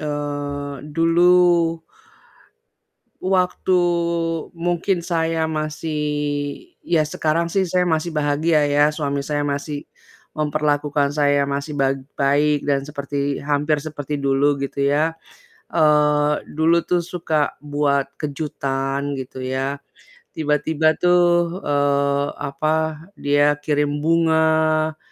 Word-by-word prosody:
eee, 145 -1 -4 0.2
dulu 175 +2 +5 1.8
waktu, 185 -1 +1 0.7
mungkin 175 +1 -1
saya 165 -2 0
masih 155 0 -3 0.8
ya 165 -3 +1
sekarang 160 +2 -1
sih 190 0 +1
saya 180 +1 +1
masih 165 -1 -1
bahagia 150 +1 +2
ya 145 +1 +3
suami 140 -2 -2
saya 145 +1 -2
masih 145 +1 -3 0.5
memperlakukan 150 -1 0
saya 145 -1 +2
masih 140 +2 -3
bag 135 -1 +1 0.2
baik 145 +1 +2
dan 140 -1 +1
seperti 140 -1 -3
hampir 145 0 0
seperti 150 -1 -5
dulu 140 +1 +2
gitu 140 0 -1
ya, 155 +3 +1 0.5
eee, 150 -2 +3
dulu 165 +2 +2
tuh 180 - 0
suka 160 -4 -1
buat 145 -2 0
kejutan 140 -2 -3
gitu 130 -1 -6
ya, 135 +2 -2 0.6
tiba-tiba 155 +1 +1
tuh, 175 0 +2
eee, 140 0 +1
apa, 155 +2 -1
dia 145 -2 +2
kirim 145 0 0
bunga, 160 -1 +2
150 Hz, 105 wpm, -21 LUFS, 145-160 Hz, 1.8 s, dulu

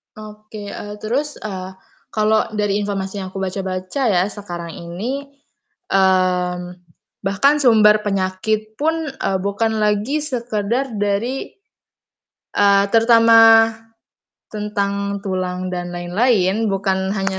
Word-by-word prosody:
Oke. 215 -1 -10
Eee, 205 0 -7
terus, 280 +7 -2
eee, 190 -2 -6 0.3
kalau 215 0 +1
dari 205 -1 0
informasi 200 -1 -3
yang 190 - -5
aku 195 - -7
baca-baca 190 +6 -3
ya, 180 -4 +3
sekarang 175 -4 -7
ini, 225 +14 -5 0.6
mmm, 185 -2 +2 0.6
bahkan 275 +10 +2
sumber 215 -5 +5
penyakit 210 +2 -2
pun, 320 0 -1
eee, 195 -7 -2
bukan 220 +3 0
lagi 210 +9 0
sekedar 240 -2 -2
dari 205 +6 -2 1.0
eee, 200 -1 +4
terutama 230 0 +6 1.1
tentang 200 -1 -2
tulang 185 -2 -3
dan 175 -1 -4
lain-lain, 195 +3 +1
bukan 190 -1 -1
hanya 195 -1 -2
205 Hz, 105 wpm, -19 LUFS, 190-225 Hz, 1.1 s, terutama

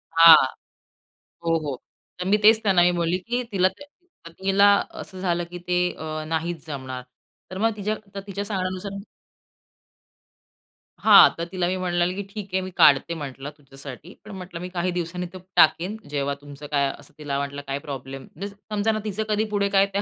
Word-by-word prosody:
हां. 165 0 +11 1.1
हो, 165 0 +2
हो. 140 -3 -3 0.4
तर 180 - -3
मी 205 +2 +4
तेच 220 +1 +6
त्यांना 190 -4 +4
मी 175 - +5
बोलली, 170 +1 0
की 240 +6 -2
तिला 185 -2 +4 0.6
पत्नीला 195 +4 +3 0.3
असं 185 -1 -9
झालं, 175 -2 0
की 175 - -7
ते 180 0 +2 0.2
अ, 155 0 -5
नाहीच 165 0 -3
जमणार. 130 -4 -6 0.5
तर 185 - -6
मग 225 +2 +2
तिच्या 210 +1 -1
आता 200 -2 -9
तिच्या 200 +1 -4
सांगण्यानुसार 185 -1 -3 2.1
हां, - - +9
तर 170 - -3
तिला 180 -1 -1
मी 185 - 0
म्हटलं, 175 -1 0 0.2
"ठीक 200 -2 -8
आहे, 190 - +1
मी 185 0 -6
काढते 145 +4 +5
म्हटलं 140 -2 -6
तुझ्यासाठी 140 +4 -11
पण 215 - -10
म्हटलं 180 -2 -8
मी 180 - -5
काही 180 0 -1
दिवसांनी 180 0 -3
तो 185 - -8 0.2
टाकीन, 180 +7 +4
जेव्हा 140 -1 -1
तुमचं 145 0 -10
काय 140 -1 +2
असं - - -16
तिला 145 -2 -3
वाटलं 140 0 -4
काय 135 0 -2
प्रॉब्लेम." 135 -2 -7
मीन्स 200 +4 -6 0.2
समजा 210 +1 +1
ना 215 - -1
तिचं 215 +1 -2
कधी 210 0 +2
पुढे 200 -1 +1
काय 195 0 +4
त्या 200 - +1
180 Hz, 175 wpm, -24 LUFS, 150-195 Hz, 2.1 s, हां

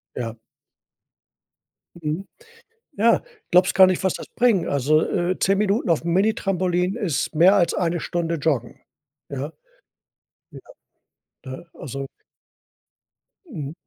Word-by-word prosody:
Ja. 115 -1 -5 1.6
Mhm. 165 +3 -4 0.7
Ja, 230 +3 +3 0.3
glaubst 180 +1 +4
gar 190 -1 +8
nicht, 185 0 -1
was 190 - +2
das - - -7
bringt. 230 -7 +3
Also, 145 +3 +2
äh, 180 0 -1
10 195 +1 +2
Minuten 210 +1 +1
aufm 165 0 +1
Minitrampolin 185 -2 +1
ist 185 - -2
mehr 175 +6 +6
als 175 -3 +3
eine 170 -1 0
Stunde 170 -1 -2
joggen. 140 -6 -2 0.5
Ja? 140 +3 -5 1.0
Ja. - - -10 0.9
Ne? 130 +6 -8
Also 135 0 -6 1.4
Mhm. 155 - -7
175 Hz, 110 wpm, -23 LUFS, 150-190 Hz, 1.6 s, gar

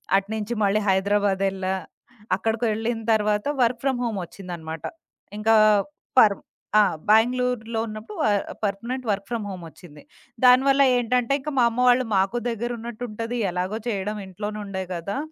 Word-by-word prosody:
అటు 195 0 +1
నుంచి 220 +2 -3
మళ్ళీ 200 +1 +3
హైదరాబాదేళ్ళా. 195 -1 +1 0.6
అక్కడకు 225 +1 -2
వెళ్ళిన 225 +2 -2
తర్వాత 210 0 +1 0.2
వర్క్ 240 0 +1
ఫ్రమ్ 265 -3 0
హోమ్ 225 -4 -2
ఒచ్చిందనమాట. 170 -4 -8 0.5
ఇంకా 220 +1 +3 0.6
పర్ 205 -4 +6 0.4
ఆ! - - +8 0.3
బాంగుళూరులో 235 0 +2
ఉన్నప్పుడు 215 - -8
వ - - +2 0.4
పర్ఫనెంట్ 235 +6 -3
వర్క్ 200 0 -3
ఫ్రమ్ 230 -3 -3
హోమొచ్చింది. 165 -4 -11 0.4
దానివల్ల 270 +2 +6 0.2
ఏంటంటే 245 +1 +1
ఇంక 295 +3 -5
మా 245 - +5
అమ్మ 230 +1 -5
వాళ్ళు 250 +1 +4
మాకు 195 +5 +1
దగ్గరున్నట్టుంటది 235 0 -4
ఎలాగో 185 +4 -2
చేయడం 210 -1 -2
ఇంట్లోనే 205 +3 -6
ఉండే 190 -1 -4
గదా! 180 +8 -4
215 Hz, 135 wpm, -24 LUFS, 195-240 Hz, 0.6 s, ఆ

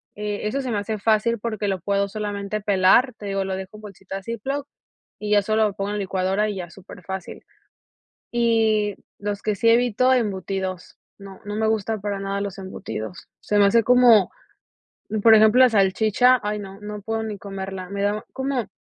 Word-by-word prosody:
eh, 210 0 -4
eso 275 +6 -1
se 260 - -4
me 215 - 0
hace 210 +1 -4
fácil 225 +2 +2
porque, 215 -2 -3
lo 190 -1 -1
puedo 200 +2 0
solamente 205 0 -4
pelar, 200 +6 +4
te 205 - -9
digo, 195 0 -1
lo 190 0 -2
dejo 190 +2 -8
en - - -14
bolsita 195 -2 -8
ziploc 270 +6 -4 0.5
y 210 0 -4
ya 205 -1 +5
solo 215 +2 +1
lo 205 - -5
pongo 200 0 -3
en 210 - -2
licuadora 195 +2 0
y 205 - -4
ya 175 -2 -6
super 185 +1 -13
fácil. 190 0 -7 0.9
Y 220 -3 +2 0.2
los 205 0 -4
que 215 -1 -1
sí 230 - +2
evito, 245 +2 +3
embutidos, 190 -5 -2 0.2
no 195 -1 -12
no 205 0 -5
me 220 0 +1
gustan 220 0 -1
para 200 0 -3
nada 195 0 -3
los 200 -1 -5
embutidos. 185 - -7
Se 210 - 0
me 200 - +6
hace 230 +3 +4
como, 245 -5 +6 0.9
por 225 -1 +8
ejemplo 220 +3 +5
la 255 - +7
salchicha, 220 +4 +3
ay 210 0 -2
no, 195 -1 -9
no 210 0 -7
puedo 225 +2 -3
ni 215 -2 -5
comerla, 190 -2 -6
me 200 0 -4
da 205 +1 -1
como 265 -5 -2
205 Hz, 190 wpm, -23 LUFS, 195-220 Hz, 0.9 s, por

